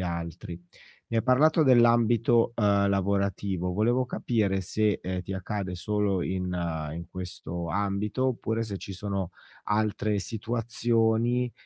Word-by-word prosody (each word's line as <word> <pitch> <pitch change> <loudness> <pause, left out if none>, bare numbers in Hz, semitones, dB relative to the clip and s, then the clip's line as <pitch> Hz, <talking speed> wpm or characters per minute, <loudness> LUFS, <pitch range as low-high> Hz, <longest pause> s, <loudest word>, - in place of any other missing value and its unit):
altri. 85 -1 -5 0.5
Mi 115 - -2
hai - - +1
parlato 150 +6 +4
dell'ambito, 120 -2 +4
uhm, 100 -2 +3
lavorativo, 100 -2 0
volevo 120 +6 +2
capire 105 -6 0
se, 105 +2 0
ehm, 90 0 -3
ti 95 - -6
accade 95 -1 -4
solo 100 0 0
in 90 0 -2
ehm, 80 -4 -3
in 85 - -7
questo 90 -2 -6
ambito, 100 +7 -1
oppure 115 -2 -1
se 105 -3 -5
ci 100 - -8
sono 95 -1 -3 0.3
altre 105 0 0
situazioni, 115 +2 0
100 Hz, 130 wpm, -27 LUFS, 90-115 Hz, 0.5 s, parlato